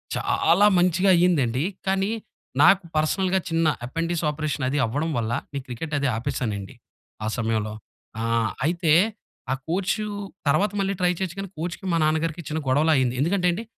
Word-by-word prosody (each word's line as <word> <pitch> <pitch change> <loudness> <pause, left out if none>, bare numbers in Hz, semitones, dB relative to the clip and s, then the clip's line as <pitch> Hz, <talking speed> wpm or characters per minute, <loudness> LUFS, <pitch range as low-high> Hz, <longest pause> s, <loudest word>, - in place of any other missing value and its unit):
చాలా 200 +5 +3
మంచిగా 180 +2 +3
అయిందండి. 145 -8 +2 0.2
కానీ, 195 +2 +1 0.5
నాకు 185 +3 +6
పర్సనల్‌గా 185 +5 +1
చిన్న 165 0 +2 0.2
ఎపెండిస్ 165 +4 -2
ఆపరేషన్ 150 -2 -2
అది 145 - -1
అవ్వడం 145 +8 -2
వల్ల 115 0 -1 0.2
ఈ - - -1
క్రికెటది 145 +3 -2
ఆపేసానండి 105 -4 -3 0.5
ఆ - - -1
సమయంలో. 110 -2 -1 0.5
ఆహ్, 115 -1 +1 0.2
అయితే 170 0 +1 0.6
ఆ - - +3 0.2
కోచు 195 +5 0 0.4
తర్వాత 170 +9 +3
మళ్ళీ 195 0 0
ట్రై 180 0 +4
చేయొచ్చు, 185 -2 -3
కానీ 195 -1 -5
కోచ్‌కి 170 +4 -5
మా - - +3
నాన్నగారికి 160 +2 0
చిన్న 155 +1 -2
గొడవలా 150 +5 +3
అయింది. 125 -2 +1
ఎందుకంటే 180 +4 +1
అండి, 180 +6 -4
160 Hz, 150 wpm, -24 LUFS, 130-180 Hz, 0.6 s, నాకు